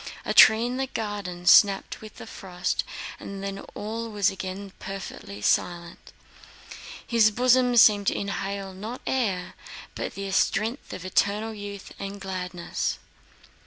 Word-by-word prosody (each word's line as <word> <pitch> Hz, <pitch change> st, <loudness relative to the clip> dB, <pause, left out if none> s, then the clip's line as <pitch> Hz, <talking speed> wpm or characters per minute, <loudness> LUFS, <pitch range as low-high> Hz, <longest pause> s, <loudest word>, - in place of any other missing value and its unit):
A -, -, 0 dB
tree 220 Hz, +1 st, +8 dB
in 250 Hz, +1 st, -2 dB
the 265 Hz, 0 st, -1 dB
garden 205 Hz, -7 st, -5 dB
snapped 195 Hz, +2 st, +5 dB
with 215 Hz, -1 st, -11 dB
the -, -, -9 dB
frost, 180 Hz, -1 st, -3 dB, 0.4 s
and 195 Hz, 0 st, -7 dB
then 195 Hz, 0 st, -4 dB, 0.2 s
all 225 Hz, +2 st, -4 dB
was 205 Hz, -2 st, +1 dB
again 190 Hz, +1 st, -6 dB
perfectly 190 Hz, -, -7 dB
silent. 170 Hz, +5 st, -1 dB, 0.9 s
His 230 Hz, -2 st, +4 dB
bosom 250 Hz, +2 st, +3 dB
seemed 205 Hz, -3 st, +6 dB
to -, -, +2 dB
inhale 195 Hz, -1 st, -4 dB
not 215 Hz, +6 st, -7 dB
air 205 Hz, -9 st, -1 dB, 0.4 s
but -, -, -5 dB
the 195 Hz, 0 st, -4 dB
strength 225 Hz, +6 st, 0 dB
of 185 Hz, -, -7 dB
eternal 205 Hz, +4 st, 0 dB
youth 205 Hz, -1 st, -8 dB
and 200 Hz, +1 st, -6 dB
gladness. 180 Hz, -2 st, -3 dB
200 Hz, 135 wpm, -26 LUFS, 190-220 Hz, 0.9 s, tree